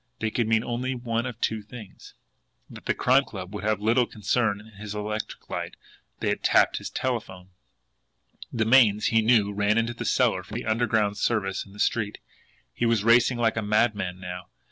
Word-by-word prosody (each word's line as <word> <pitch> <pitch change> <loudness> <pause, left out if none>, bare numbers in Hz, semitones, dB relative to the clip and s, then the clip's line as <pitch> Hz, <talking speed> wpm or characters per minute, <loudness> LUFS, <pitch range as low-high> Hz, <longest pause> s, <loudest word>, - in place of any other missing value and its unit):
They 110 -1 -2
could 115 -1 0
mean 110 0 +2
only 125 +2 -2
one 120 0 -2
of 120 -2 -7
two 110 -1 -1
things 105 -2 -12 0.5
and - - -13
the - - 0
Crime 130 +2 +4
Club 95 -5 -8
would 100 -2 -5
have 110 -1 +1
little 115 +3 +2
concern 105 0 0
in 105 - -14
his 105 0 -6
electric 105 +1 -5
light! - - -5 0.5
THEY - - 0
HAD - - -1
TAPPED - - +3
HIS - - -5
TELEPHONE. 95 -8 -4 1.0
The 110 -2 0
mains, 110 -3 +5
he 115 -1 +3
knew, 110 -3 +3
ran 105 +2 +1
into 115 +1 0
the 120 - -6
cellar 115 -7 +2
from 100 +4 -10
the 120 - -4
underground 110 -2 +1
service 100 -4 -1
in 100 - -16
the 105 - -14
street. 105 -1 0 0.6
He 120 - 0
was 115 -3 +2
racing 120 +2 +4
like 115 -1 +1
a - - +1
madman 105 -3 0
now. 90 0 -7
110 Hz, 190 wpm, -26 LUFS, 105-120 Hz, 1.0 s, mains